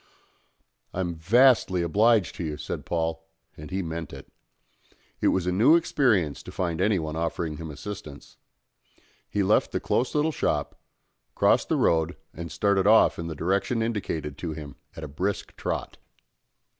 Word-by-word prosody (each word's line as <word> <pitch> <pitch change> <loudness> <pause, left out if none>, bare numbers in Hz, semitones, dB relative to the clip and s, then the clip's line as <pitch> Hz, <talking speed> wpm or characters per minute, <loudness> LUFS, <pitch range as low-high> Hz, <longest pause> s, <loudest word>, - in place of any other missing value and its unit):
"I'm 90 -2 -1
vastly 95 +1 +4
obliged 105 +3 +3
to - - -4
you," 75 -2 -4
said - - -6
Paul, 80 -1 -1 0.3
and 75 0 -10
he 95 +1 -2
meant 80 -2 -5
it. - - -10 0.9
It - - +3
was 95 -2 +1
a 90 - +1
new 110 - +5
experience 115 - +1
to - - -10
find 85 -2 -2
anyone 90 -7 0
offering 80 -1 -2
him 80 0 -7
assistance. 75 -1 -9 0.9
He 100 - 0
left 105 +3 +2
the - - -1
close 125 - -1
little 150 +2 +2
shop, - - -1 0.6
crossed - - +3
the - - +2
road, 80 +1 +1 0.2
and 85 -1 -7
started 95 +4 +2
off 110 -4 +5
in 85 - -4
the 80 - -5
direction 100 - 0
indicated 80 -10 -3
to 80 -3 -4
him 75 -2 -8 0.2
at 80 - -8
a - - -4
brisk 95 +8 -3
trot. - - -4
85 Hz, 155 wpm, -26 LUFS, 80-105 Hz, 0.9 s, new